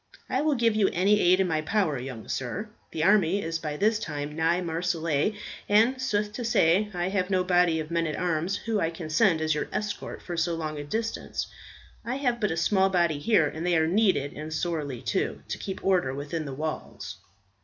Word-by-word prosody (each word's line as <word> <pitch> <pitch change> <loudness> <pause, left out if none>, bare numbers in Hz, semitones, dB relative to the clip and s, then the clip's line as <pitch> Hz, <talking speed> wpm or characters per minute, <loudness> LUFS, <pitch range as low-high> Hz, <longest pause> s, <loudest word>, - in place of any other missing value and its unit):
I 260 - 0
will 300 -1 +2
give 230 -3 +2
you 210 -3 +3
any 200 +4 +3
aid 180 0 +4
in 190 - +3
my 160 -2 0
power, 160 - 0
young 125 -3 -7
sir. 185 - -3 0.2
The 160 - -2
army 195 -1 +4
is 165 -3 -3
by 150 -2 -4
this 215 +3 +2
time 150 -4 -4
nigh 165 +2 +2
Marseilles, 170 0 0 0.3
and, 230 +6 +4
sooth 210 -4 0
to 245 - -4
say, 205 -2 +3
I 175 -1 -2
have 190 -1 0
no 185 -2 +2
body 175 -3 +3
of 155 +1 -5
men 170 -1 +1
at 155 - -2
arms 175 +2 0
whom 220 -1 -1
I 165 - +1
could 165 -1 -7
send 170 -2 +3
as 155 0 +2
your 150 - -3
escort 210 0 -4
for 175 - -5
so 170 0 0
long 155 -2 -4
a - - -4
distance. 220 +10 -3 0.6
I 240 +2 -3
have 250 -4 0
but 210 - +2
a 160 - -2
small 190 +3 +3
body 170 -5 +1
here, 165 -1 +3
and 160 +3 -5
they 175 -1 +2
are 160 - +3
needed, 185 -5 +2
and 155 +1 -7
sorely 155 -6 -3
too, - - -1
to - - -3
keep 190 -1 -6
order 180 -9 +2
within 150 +3 -4
the 135 -2 -5
walls." 155 +2 -5
175 Hz, 215 wpm, -27 LUFS, 155-205 Hz, 0.6 s, aid